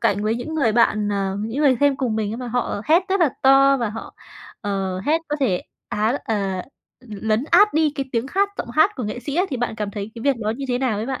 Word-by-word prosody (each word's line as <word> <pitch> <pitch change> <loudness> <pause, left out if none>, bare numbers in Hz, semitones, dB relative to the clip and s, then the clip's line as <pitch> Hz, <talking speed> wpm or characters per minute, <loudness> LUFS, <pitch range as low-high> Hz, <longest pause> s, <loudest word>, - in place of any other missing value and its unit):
cạnh 205 +1 +1
với 215 +1 +1
những 310 +7 -5
người 255 -9 +2
bạn, 215 -2 +2
ờ, 195 -1 -1
những 225 +6 -4
người 265 -3 +4
xem 285 -2 +3
cùng 240 -5 -1
mình 215 -1 -1
ấy, - - -4
mà 250 -1 -6
họ 245 -3 -2
hét 325 +5 +4
rất 385 -1 +1
là 330 - +5
to, 275 +1 +6
và 235 -5 -2
họ, 225 +2 -8 0.5
ờ, 195 -2 -2
hét 310 +2 +2
có 295 - -1
thể, 195 -10 +1 0.3
á, 220 +6 0
à, 195 -4 -1 0.4
l 240 -4 -10
lấn 220 +5 +2
át 410 +3 +5
đi 315 -1 +3
cái 275 -2 -3
tiếng 235 +1 0
khác 395 +7 +1
giọng 235 - -4
hát 315 +10 +4
của 255 - -4
nghệ 210 +4 -4
sĩ 280 +4 -5
á, 365 - +3
thì 265 - -2
bạn 240 -2 -2
cảm 210 -2 -4
thấy 205 +1 -6
cái 230 - -8
việc 280 -3 +2
đó 215 -2 -2
như 275 - -5
thế 245 -1 0
nào 250 -5 0
ấy 220 - -3
bạn? 265 -1 -3
240 Hz, 275 wpm, -22 LUFS, 210-280 Hz, 0.5 s, to